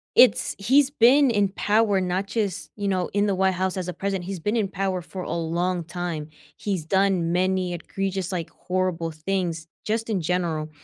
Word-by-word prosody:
it's 250 - +5
he's 265 +7 +4
been 270 +1 +5
in 205 -3 +2
power 205 0 +2
not 185 +2 -1
just, 205 -5 -2
you 205 -1 -3
know, 185 -2 0
in 205 0 +2
the 200 -2 +1
White 190 0 +2
House 190 +1 -1
as 185 -1 -3
a 180 - -3
president. 190 0 -3
He's 190 -2 -4
been 210 +7 -1
in 215 -4 +1
power 190 -2 -1
for 185 +2 -7
a - - -5
long 170 +1 -1
time. 160 -2 -4 0.3
He's 190 -7 -2
done 190 -2 +2
many 185 0 +1
egregious, 190 +1 -3
like, 170 -3 -3
horrible 180 -3 -2
things, 165 0 -2 0.2
just 225 +1 -1
in 195 -5 0
general. 165 -2 -1
185 Hz, 190 wpm, -24 LUFS, 175-200 Hz, 0.3 s, it's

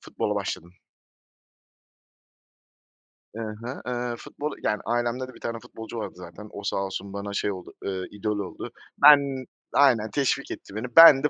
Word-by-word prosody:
futbola - - -2
başladım. 85 +2 -3 2.6
I 115 - -5
hı, 115 +4 -5
eee, 120 -1 -2
futbolu 150 +5 -5
yani 105 - +1
ailemde 120 +2 0
de 130 - -11
1 - - -14
tane 115 0 -3
futbolcu 110 +1 -9
vardı 110 - -4
zaten, 90 +4 -10
o 100 - -8
sağ - - -1
olsun 95 0 -3
bana 100 0 -4
şey 100 0 0
oldu, 95 -2 -8
eee, 95 -1 -2
idol 105 0 -2
oldu. 95 -3 -5 0.3
Ben 140 -3 +7 0.3
Aynen. 125 -6 +5
Teşvik 140 +2 0
etti 100 - -8
beni, 110 +3 -3
ben 165 -5 +11
de 150 - +3
115 Hz, 160 wpm, -26 LUFS, 100-130 Hz, 2.6 s, ben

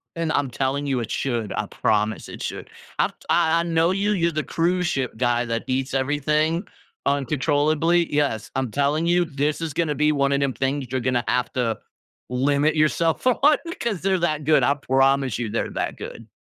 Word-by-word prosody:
And 165 -1 -1
I'm 145 -3 0
telling 135 +3 -1
you, 130 -3 0
it 115 - -5
should, 120 -5 -2
I - - -1
promise 105 +1 0
it - - -9
should. - - -5 0.3
I - - +4
t - - -17 0.2
I 165 -1 +3
I - - +1
know 165 0 +2
you, 200 +2 0
you're 170 -4 +1
the 155 -1 -2
cruise 175 +3 0
ship 130 -7 -2
guy 120 0 +1
that 115 0 -2
eats 130 +1 -1
everything 150 +5 +1 0.4
uncontrollably 145 +5 +1
yes, 145 -7 0
I'm 130 -2 -1
telling 145 +6 0
you, 175 +1 +3
this 145 +1 -2
is 160 -4 -3
gonna 155 -2 0
be 150 +1 +3
one 140 -1 +1
of 140 - +1
'em 140 -2 0
things 135 0 -2
you're 130 - 0
gonna 120 -1 0
have 125 -2 0
to 115 -4 0 0.5
limit 140 +4 +1
yourself 160 +4 +1
on 280 +4 +4 0.2
'cause 215 -7 -2
they're 190 -1 +1
that 155 -3 0
good, 150 +1 +4
I 140 - +4
promise 135 -3 +1
you 115 -3 -2
they're 115 - -2
that - - -3
good. 115 - -9
145 Hz, 195 wpm, -23 LUFS, 130-165 Hz, 0.5 s, I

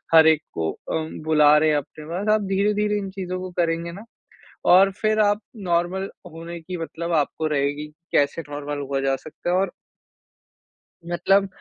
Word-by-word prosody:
हर 160 0 +9
एक 160 -1 +5
को 80 -1 -1 0.2
अम, 160 0 -3
बुला 150 -1 +5
रहे 155 +1 +3
हैं 150 - +3
अपने 150 +1 -7
पास, 175 +6 -4
आप 215 - 0
धीरे-धीरे 210 +1 +1
इन 195 -1 -5
चीज़ों 185 -1 -4
को 185 0 -6
करेंगे 170 0 -1
ना 200 +6 -10 0.7
और 190 +2 +7
फिर 215 +2 0
आप 205 0 +3 0.3
नॉर्मल 175 +3 0 0.2
होने 165 +1 -7
की 180 +3 -6
मतलब 170 +1 -4
आपको 155 +2 -4
रहेगी 145 0 -1 0.3
कैसे 145 +3 +2
नॉर्मल 145 0 -4
हुआ 135 -1 0
जा 135 0 +1
सकता 155 +5 -6
है। 180 - +3
और 195 +1 +1 1.4
मतलब, 195 +3 +3
170 Hz, 170 wpm, -23 LUFS, 150-190 Hz, 1.4 s, हर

